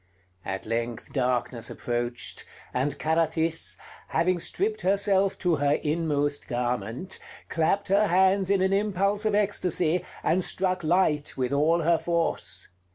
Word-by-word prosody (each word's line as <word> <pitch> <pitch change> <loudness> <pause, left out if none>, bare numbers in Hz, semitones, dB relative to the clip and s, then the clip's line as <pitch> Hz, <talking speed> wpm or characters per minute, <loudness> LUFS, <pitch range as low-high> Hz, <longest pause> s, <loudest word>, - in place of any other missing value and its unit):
At 95 0 -4
length 115 +1 -3
darkness 125 -3 -1
approached, 120 0 -3 0.3
and 135 +3 -1
Carathis, 160 +1 +1 0.3
having 175 +1 +1
stripped 425 - -1
herself 195 0 +2
to 175 -4 +1
her 145 0 +2
inmost 150 -2 -1
garment, 120 - -2 0.3
clapped 185 +5 0
her 205 +2 +4
hands 190 +1 +3
in 195 -1 +3
an 190 +1 +2
impulse 200 +1 +1
of 215 -1 +2
ecstasy, 180 -4 +1 0.2
and 180 +4 +2
struck 185 -1 0
light 155 -3 +1
with 130 +1 -1
all 160 +4 +3
her 165 0 +3
force. 170 -1 -1
165 Hz, 130 wpm, -26 LUFS, 140-190 Hz, 0.3 s, her